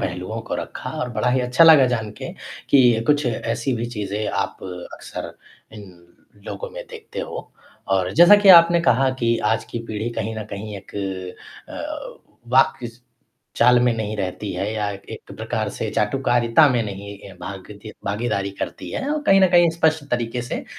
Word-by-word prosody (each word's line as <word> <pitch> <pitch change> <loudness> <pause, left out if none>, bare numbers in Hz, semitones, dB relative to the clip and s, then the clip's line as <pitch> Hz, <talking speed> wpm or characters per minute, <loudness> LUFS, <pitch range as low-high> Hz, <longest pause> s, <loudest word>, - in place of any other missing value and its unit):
पहलुओं 90 +5 -4
को - - -2
रखा - - -6
और 125 - -3
बड़ा 125 - 0
ही 130 +1 +2
अच्छा 125 +6 +4
लगा 155 -5 +8
जानके 110 -2 -6 0.4
कि 125 -5 +5
कुछ 145 -1 +2
ऐसी 120 +2 -2
भी 115 +1 -3
चीज़ें 105 +1 -3
आप - - -2 0.4
अक्सर - - -8 0.4
इन 105 -2 -10 0.6
लोगों - - -6
में - - -8
देखते 455 -1 -8
हो - - -7 0.4
और 95 -1 +1
जैसा 175 +6 +8
कि 205 -1 +3
आपने 170 +1 +1
कहा 135 -4 +3
कि 115 0 +2 0.2
आज 110 - -2
की - - -4
पीढ़ी 110 +2 -4
कहीं 110 0 -3
न 110 - -5
कहीं 105 +1 -6
एक 95 - -17 0.7
अ, - - -7 0.3
वाक्य 130 -1 +3
इस 120 +1 -14 0.5
चाल 125 +1 +5
में 120 0 +3
नहीं 110 -1 -3
रहती 100 +1 -4
है 105 +2 -3
या 105 -2 -2
एक 100 -1 -10
प्रकार - - -3
से - - -4
चाटुकारिता 120 +5 +3
में 125 -3 +1
नहीं 100 -1 -7
ए, 100 -1 -12
भागदी 100 +2 -9
भागीदारी 100 -1 -2
करती - - -5
है 275 - -3
और 305 - -1
कहीं 195 0 +6
न 190 - +5
कहीं 175 -1 +6
स्पष्ट 160 -2 +1
तरीक़े 120 0 -2
से, 125 - -5
120 Hz, 175 wpm, -22 LUFS, 105-145 Hz, 0.7 s, लगा